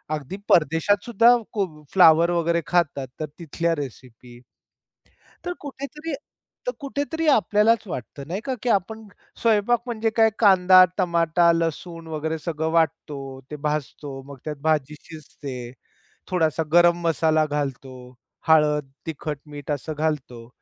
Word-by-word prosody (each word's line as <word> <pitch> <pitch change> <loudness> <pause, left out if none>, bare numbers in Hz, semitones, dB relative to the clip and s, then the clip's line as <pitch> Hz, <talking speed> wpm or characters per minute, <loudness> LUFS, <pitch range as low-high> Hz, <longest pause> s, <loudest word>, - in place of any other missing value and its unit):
अगदी 150 +6 -7
परदेशातसुद्धा 205 - +4 0.2
कोब 180 -8 -3
फ्लॉवर 170 -2 +6
वगैरे 170 0 +1
खातात 150 -6 0
तर 155 - -2
तिथल्या 170 +1 -1
रेसिपी. 125 -3 -9 1.1
तर 355 - -2
कुठेतरी 290 +3 -7 0.5
तर - - +2
कुठेतरी 290 +3 -3
आपल्यालाच 220 -3 +3
वाटतं 140 -1 -7
नाही 190 +5 -4
का, 265 - -1
की 245 - -1
आपण 220 +1 -1 0.3
स्वयंपाक 230 +1 +2
म्हणजे 225 -2 -1
काय 225 0 +4
कांदा, 185 -3 +7
टमाटा, 170 -2 +3
लसूण 165 0 -3
वगैरे 160 0 -3
सगळं 160 -1 -3
वाटतो, 160 -3 0 0.3
ते - - -4
भाजतो, 145 -2 -4
मग 140 -1 -10
त्यात 150 -1 -3
भाजी 150 -2 0
शिजते. 140 -6 -9 0.6
थोडासा 160 -3 +1
गरम 175 0 +5
मसाला 160 -1 +2
घालतो, 140 -3 -4 0.5
हळद, 150 -3 +3 0.2
तिखट, 150 -2 -4
मीठ 145 0 -8
असं 145 +2 -3
घालतो. 130 -7 -3
165 Hz, 125 wpm, -23 LUFS, 150-200 Hz, 1.1 s, कांदा